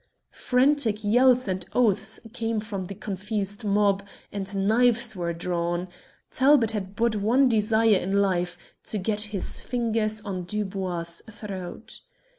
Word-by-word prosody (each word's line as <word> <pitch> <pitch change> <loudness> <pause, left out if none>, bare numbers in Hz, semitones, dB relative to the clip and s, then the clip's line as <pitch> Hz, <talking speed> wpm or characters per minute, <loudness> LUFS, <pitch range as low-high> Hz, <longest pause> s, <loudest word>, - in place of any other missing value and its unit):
Frantic 250 -4 +1
yells 250 +3 +4
and 185 -1 -2
oaths 220 -6 +1
came 225 -2 -1
from 205 -3 -5
the 195 - -7
confused 205 +2 -3
mob, 200 -1 +2 0.3
and 195 -1 -2
knives 235 0 +3
were 170 -2 -2
drawn. 175 +1 -2 0.4
Talbot 260 -4 +4
had 200 -2 -5
but 230 0 +1
one 240 +7 +3
desire 220 -2 +3
in 195 +2 0
life 180 -3 0 0.3
to 215 - -2
get 210 +2 -1
his 200 -3 -2
fingers 225 -3 0
on 185 -4 -5
Dubois' 185 -4 -3
throat. 205 -1 -8
210 Hz, 130 wpm, -26 LUFS, 190-225 Hz, 0.4 s, yells